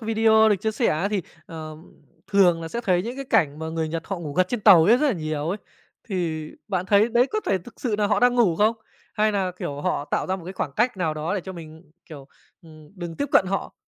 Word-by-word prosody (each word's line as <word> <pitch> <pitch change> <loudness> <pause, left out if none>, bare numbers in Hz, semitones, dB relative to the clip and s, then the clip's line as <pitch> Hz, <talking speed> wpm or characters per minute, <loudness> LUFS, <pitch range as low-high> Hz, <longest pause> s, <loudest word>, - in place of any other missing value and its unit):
video 220 0 +4
được 210 - +3
chia 220 +4 -2
sẻ 235 +2 0
á 165 +6 0
thì, 205 -3 -1 0.2
ờm, 155 0 -10 0.3
thường 180 -5 +3
là 165 - -5
sẽ 235 - -4
thấy 180 -6 +1
những 240 +5 -6
cái 275 - -5
cảnh 160 - +1
mà 160 0 -5
người 160 0 -2
Nhật 165 +1 -4
họ 195 - -4
ngủ 155 -4 -6
gật 185 +3 +1
trên 245 - -2
tàu 190 -6 +7
ấy, 225 +6 +6
rất 300 +4 +1
là 275 - +2
nhiều 155 -2 -3
ấy. 195 - -2 0.5
Thì 165 -6 -3 0.2
bạn 185 -2 -2
thấy 205 +3 +4
đấy 240 +2 +3
có 430 - -1
thể 195 - +1
thực 185 +7 -15
sự 235 -5 -1
nà 210 - +2
họ 205 0 +1
đang 245 0 +4
ngủ 215 -9 +3
không? 215 +4 +2 0.4
Hay 215 0 +2
nà, 195 -2 0
kiểu, 145 0 -5
họ 145 - -1
tạo - - 0
ra 190 +1 -1
một 180 - -11
cái 185 - -7
khoảng 150 -6 -4
cách 240 +1 +1
nào 165 -4 -1
đó 155 +5 -3
để 200 - -1
cho 190 +2 -8
mình, 160 -2 -12 0.2
kiểu, 145 -4 -11 0.3
ừm, 155 -2 -16
đừng 170 -2 -7
tiếp 285 - -1
cận - - +5
họ? 195 +1 -3
185 Hz, 265 wpm, -24 LUFS, 160-220 Hz, 0.5 s, tàu